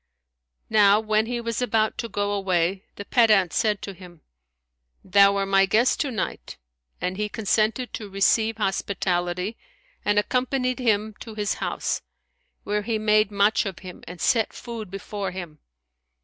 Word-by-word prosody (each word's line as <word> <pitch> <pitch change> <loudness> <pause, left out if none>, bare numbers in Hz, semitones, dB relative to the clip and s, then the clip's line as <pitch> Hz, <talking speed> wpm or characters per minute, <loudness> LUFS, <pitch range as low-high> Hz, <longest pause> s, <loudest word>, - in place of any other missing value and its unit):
Now 210 -1 +6
when 215 0 +1
he 240 0 -2
was 230 0 -3
about 220 -3 +1
to 230 - -3
go 205 -1 -1
away, 190 -1 0
the 200 - -8
pedant 210 -7 +4
said 210 -3 +1
to 200 - -5
him, 175 -3 -14 0.8
"Thou 200 +1 +5
are 195 0 0
my 195 0 +3
guest 225 +6 +2
to 290 - 0
night;" 230 - -4 0.4
and 180 +1 -3
he 210 0 -2
consented 220 +3 0
to 210 -2 -6
receive 220 +3 +2
hospitality 190 -1 -1 0.5
and 205 0 +1
accompanied 255 +3 0
him 215 -3 +1
to 220 -2 -9
his 210 -1 -1
house, - - -2 0.6
where 210 0 -1
he 220 +1 -1
made 215 -1 +3
much 205 +1 +2
of 190 - -6
him 180 - -10
and 175 0 -9
set 225 +5 +2
food 230 -4 -7
before 195 +1 -5
him. 175 -5 -8
210 Hz, 155 wpm, -24 LUFS, 195-220 Hz, 0.8 s, Now